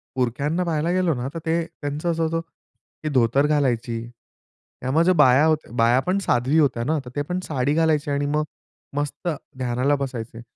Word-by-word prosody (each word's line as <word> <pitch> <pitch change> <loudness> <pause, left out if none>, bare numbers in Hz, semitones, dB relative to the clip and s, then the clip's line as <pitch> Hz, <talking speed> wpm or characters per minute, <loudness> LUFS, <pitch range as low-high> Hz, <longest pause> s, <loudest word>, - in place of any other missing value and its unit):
पुरख्यांना 140 +7 0
पाहायला 165 -1 0
गेलो 180 -2 +2
ना 125 +1 -3
तर 165 - -4
ते 165 +1 +1
त्यांचं 150 +3 -3
असं 165 0 -1
होतं, 165 +1 0 0.6
की 155 - -1
धोतर 130 +2 +3
घालायची. 120 -6 0 0.8
त्यामध्ये 160 +8 +3
बाया 145 -2 +5
होत्या 155 -6 0
बाया 120 +2 +4
पण 185 +2 +2
साध्वी 135 -5 +1
होत्या 130 -6 +2
ना 155 +6 0
तर - - -7
ते 145 - 0
पण 180 +1 -1
साडी 140 -3 0
घालायची 155 -2 +2
आणि 140 0 0
मग 150 +1 +1 0.5
मस्त 145 +4 -3 0.3
ध्यानाला 130 +3 +1
बसायचे. 120 -4 -5
145 Hz, 170 wpm, -23 LUFS, 125-160 Hz, 0.8 s, बाया